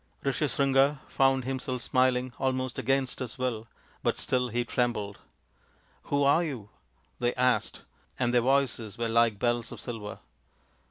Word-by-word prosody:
Rishyasringa 140 Hz, 0 st, +2 dB
found 135 Hz, -1 st, +2 dB
himself 130 Hz, -2 st, -3 dB
smiling, 130 Hz, 0 st, +2 dB
almost 130 Hz, -1 st, -1 dB
against 135 Hz, +1 st, 0 dB
his 130 Hz, -1 st, -5 dB
will: 120 Hz, -3 st, -2 dB, 0.3 s
but -, -, 0 dB
still 125 Hz, -1 st, 0 dB
he 120 Hz, +1 st, -1 dB
trembled. 115 Hz, -5 st, -1 dB, 0.4 s
" -, -, -35 dB
Who 140 Hz, 0 st, +1 dB
are 145 Hz, +5 st, +4 dB
you? 125 Hz, -11 st, -5 dB, 0.2 s
" -, -, -39 dB
they 120 Hz, 0 st, 0 dB
asked, 125 Hz, 0 st, +1 dB, 0.3 s
and 120 Hz, -1 st, +1 dB
their 120 Hz, -, +5 dB
voices 125 Hz, -4 st, +1 dB
were 115 Hz, -1 st, -1 dB
like 115 Hz, -2 st, +3 dB
bells 120 Hz, +1 st, 0 dB
of -, -, -8 dB
silver. 110 Hz, -4 st, -6 dB
125 Hz, 150 wpm, -28 LUFS, 120-135 Hz, 0.4 s, their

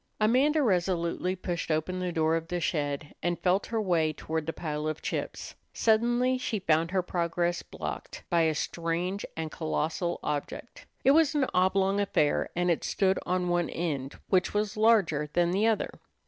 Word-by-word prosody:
Amanda 270 Hz, +8 st, +3 dB
resolutely 180 Hz, -3 st, 0 dB
pushed 175 Hz, -2 st, -4 dB
open 160 Hz, +4 st, -1 dB
the 180 Hz, -1 st, -2 dB
door 160 Hz, -1 st, +2 dB
of 165 Hz, 0 st, -3 dB
the 175 Hz, 0 st, -2 dB
shed, 145 Hz, -3 st, -2 dB
and 175 Hz, 0 st, 0 dB
felt 185 Hz, +2 st, +1 dB
her 230 Hz, -, -1 dB
way 170 Hz, -6 st, +2 dB
toward 160 Hz, 0 st, -4 dB
the -, -, 0 dB
pile 150 Hz, -2 st, -4 dB
of 155 Hz, 0 st, -4 dB
chips. -, -, -4 dB, 0.2 s
Suddenly 240 Hz, +3 st, +2 dB
she 225 Hz, -, -2 dB
found 165 Hz, -3 st, +2 dB
her 185 Hz, 0 st, 0 dB
progress 175 Hz, 0 st, -1 dB
blocked 75 Hz, -2 st, -7 dB
by 170 Hz, -1 st, +2 dB
a 160 Hz, -1 st, +2 dB
strange 170 Hz, +5 st, -2 dB
and 160 Hz, -1 st, -3 dB
colossal 165 Hz, +2 st, -2 dB
object. 145 Hz, -1 st, -5 dB, 0.2 s
It 270 Hz, -, +6 dB
was 310 Hz, 0 st, +4 dB
an 285 Hz, -3 st, +3 dB
oblong 190 Hz, +2 st, +2 dB
affair, 155 Hz, -7 st, +1 dB
and 175 Hz, 0 st, +2 dB
it 165 Hz, -, -1 dB
stood 190 Hz, -1 st, +1 dB
on 180 Hz, 0 st, 0 dB
one 175 Hz, -1 st, +1 dB
end, 145 Hz, -5 st, -3 dB
which 185 Hz, +1 st, +1 dB
was 210 Hz, 0 st, 0 dB
larger 200 Hz, -10 st, +3 dB
than 175 Hz, 0 st, +2 dB
the 205 Hz, +4 st, +2 dB
other. 225 Hz, -2 st, +1 dB
175 Hz, 175 wpm, -28 LUFS, 160-200 Hz, 0.2 s, It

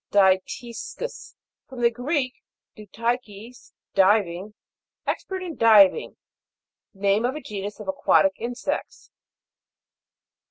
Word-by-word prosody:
DYTIS'CUS. 205 Hz, -, -1 dB, 0.3 s
From 255 Hz, -2 st, -8 dB
the 235 Hz, 0 st, +4 dB
Greek, 255 Hz, +2 st, -1 dB, 0.4 s
dutikos, 230 Hz, +2 st, -5 dB, 0.2 s
diving, 195 Hz, 0 st, +2 dB, 0.5 s
expert 380 Hz, -1 st, -3 dB
in 340 Hz, -4 st, -6 dB
diving. 215 Hz, -4 st, +5 dB, 0.7 s
Name 200 Hz, +1 st, +1 dB
of 250 Hz, +3 st, 0 dB
a -, -, -4 dB
genus 205 Hz, -5 st, -6 dB
of 210 Hz, -, -9 dB
aquatic 190 Hz, 0 st, +3 dB
insects. 240 Hz, +2 st, -5 dB
220 Hz, 90 wpm, -24 LUFS, 195-245 Hz, 0.7 s, diving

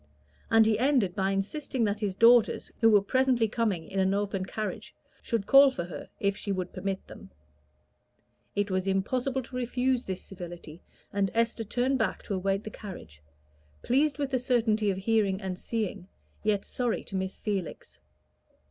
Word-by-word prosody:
And 225 Hz, -1 st, +6 dB
he 220 Hz, -1 st, +2 dB
ended 250 Hz, -9 st, +2 dB
by 195 Hz, -1 st, +1 dB
insisting 230 Hz, +6 st, -2 dB
that 205 Hz, -1 st, 0 dB
his 200 Hz, -3 st, -2 dB
daughters, 230 Hz, +2 st, +4 dB
who 225 Hz, -, +6 dB
were 205 Hz, -2 st, +5 dB
presently 255 Hz, 0 st, +2 dB
coming 210 Hz, -7 st, -1 dB
in 195 Hz, -, -3 dB
an 190 Hz, +1 st, +2 dB
open 200 Hz, -2 st, -2 dB
carriage, 215 Hz, +1 st, -5 dB, 0.3 s
should 225 Hz, -4 st, -1 dB
call 275 Hz, +4 st, +8 dB
for 180 Hz, -9 st, -4 dB
her 170 Hz, -2 st, -8 dB
if 200 Hz, 0 st, +1 dB
she 200 Hz, -, -4 dB
would 185 Hz, -2 st, -3 dB
permit 190 Hz, +1 st, -3 dB
them. -, -, -12 dB, 1.3 s
It 205 Hz, -1 st, 0 dB
was 185 Hz, +1 st, 0 dB
impossible 250 Hz, +7 st, 0 dB
to 250 Hz, -, -10 dB
refuse 250 Hz, +1 st, 0 dB
this 190 Hz, -1 st, -4 dB
civility, 175 Hz, -3 st, -9 dB, 0.3 s
and 200 Hz, -1 st, +1 dB
Esther 230 Hz, 0 st, +1 dB
turned 255 Hz, +5 st, 0 dB
back -, -, -1 dB
to 205 Hz, -, -4 dB
await 195 Hz, +2 st, 0 dB
the 215 Hz, -, -7 dB
carriage, 80 Hz, -, -10 dB, 0.6 s
pleased 280 Hz, +3 st, +2 dB
with 280 Hz, -2 st, -2 dB
the 260 Hz, -, +1 dB
certainty 225 Hz, -4 st, +2 dB
of 190 Hz, -, -1 dB
hearing 195 Hz, -1 st, +1 dB
and 190 Hz, -2 st, -5 dB
seeing, 205 Hz, -5 st, -3 dB, 0.3 s
yet 210 Hz, -2 st, 0 dB
sorry 245 Hz, -3 st, -1 dB
to 195 Hz, -, -8 dB
miss 190 Hz, 0 st, -2 dB
Felix. 195 Hz, -, -5 dB
210 Hz, 170 wpm, -28 LUFS, 190-240 Hz, 1.3 s, call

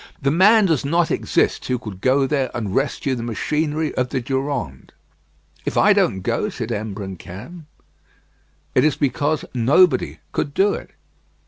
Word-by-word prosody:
The 140 Hz, -, +1 dB
man 205 Hz, +6 st, +5 dB
does 160 Hz, -7 st, +1 dB
not 165 Hz, +4 st, +1 dB
exist -, -, 0 dB
who 125 Hz, -, 0 dB
could 105 Hz, -6 st, -9 dB
go 135 Hz, +1 st, +3 dB
there 135 Hz, -2 st, 0 dB
and 105 Hz, -5 st, -3 dB
rescue 135 Hz, +1 st, 0 dB
the 120 Hz, -, -3 dB
machinery 150 Hz, +7 st, -1 dB
of 125 Hz, 0 st, -1 dB
the -, -, -1 dB
Durande." 130 Hz, -, -3 dB, 0.7 s
"If -, -, -3 dB
I -, -, +6 dB
don't 95 Hz, -, +1 dB
go," 120 Hz, -, -1 dB
said 120 Hz, -, -5 dB
Imbrancam, 105 Hz, -, -7 dB, 1.1 s
"it -, -, +4 dB
is 155 Hz, -1 st, +3 dB
because 145 Hz, +2 st, 0 dB
nobody 140 Hz, +9 st, +3 dB
could 140 Hz, -, -3 dB
do 200 Hz, +1 st, +3 dB
it." -, -, -7 dB
135 Hz, 150 wpm, -21 LUFS, 115-155 Hz, 1.1 s, I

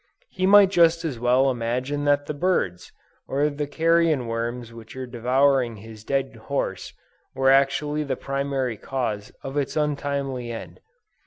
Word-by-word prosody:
He 185 Hz, -, 0 dB
might 200 Hz, -1 st, +7 dB
just 170 Hz, -2 st, +4 dB
as 135 Hz, -7 st, -3 dB
well 125 Hz, +3 st, +3 dB
imagine 125 Hz, +4 st, -2 dB
that 145 Hz, 0 st, +2 dB
the 150 Hz, -, -4 dB
birds, 145 Hz, -, -1 dB, 0.4 s
or 145 Hz, +2 st, +1 dB
the 145 Hz, 0 st, -4 dB
carrion 165 Hz, -3 st, +2 dB
worms 115 Hz, +1 st, -4 dB
which 115 Hz, 0 st, -12 dB
are 130 Hz, 0 st, -5 dB
devouring 125 Hz, +1 st, +1 dB
his 110 Hz, +1 st, -12 dB
dead 135 Hz, 0 st, -1 dB
horse, 110 Hz, -5 st, -3 dB, 0.4 s
were 135 Hz, 0 st, +4 dB
actually 145 Hz, +2 st, +2 dB
the 140 Hz, -, -2 dB
primary 135 Hz, -4 st, -2 dB
cause 110 Hz, -6 st, -3 dB
of 135 Hz, +2 st, -5 dB
its 140 Hz, +1 st, -1 dB
untimely 140 Hz, -4 st, -2 dB
end. 115 Hz, -, -8 dB
135 Hz, 150 wpm, -24 LUFS, 120-145 Hz, 0.4 s, might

